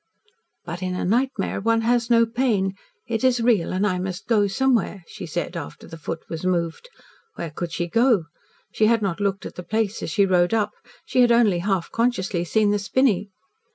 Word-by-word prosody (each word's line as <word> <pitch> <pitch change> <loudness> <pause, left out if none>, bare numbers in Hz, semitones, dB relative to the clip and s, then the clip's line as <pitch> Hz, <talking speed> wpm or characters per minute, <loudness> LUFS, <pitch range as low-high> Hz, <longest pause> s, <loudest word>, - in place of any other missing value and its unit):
"But 175 +1 -6
in 185 0 -2
a - - -2
nightmare 235 0 0
one 230 +2 +2
has 235 +1 +1
no 230 -1 +5
pain. 225 -5 0 0.3
It 225 0 -2
is 255 -2 +3
real 230 -7 +2
and 185 +2 0
I 185 -3 0
must 185 -1 -4
go 210 -4 +3
somewhere," 220 -3 0
she 190 -5 -8
said, 175 +2 -3
after 165 -4 -7
the - - -10
foot 165 +1 -5
was 165 0 -6
moved. 175 - -1 0.5
Where 165 - -5
could 170 +2 -5
she 175 - -2
go? 230 -1 +3 0.5
She 215 - +3
had 230 -1 +2
not 195 -2 -1
looked 200 -1 -1
at - - -7
the - - -7
place 215 +3 -1
as - - -3
she 200 -2 +3
rode 180 +2 +3
up. 210 -2 +1 0.3
She 255 - +2
had 240 -1 +5
only 225 -7 +4
half 190 -1 -1
consciously 205 -7 0
seen 210 +3 +2
the 205 - +1
spinney. 210 -2 +1
205 Hz, 200 wpm, -23 LUFS, 180-230 Hz, 0.5 s, no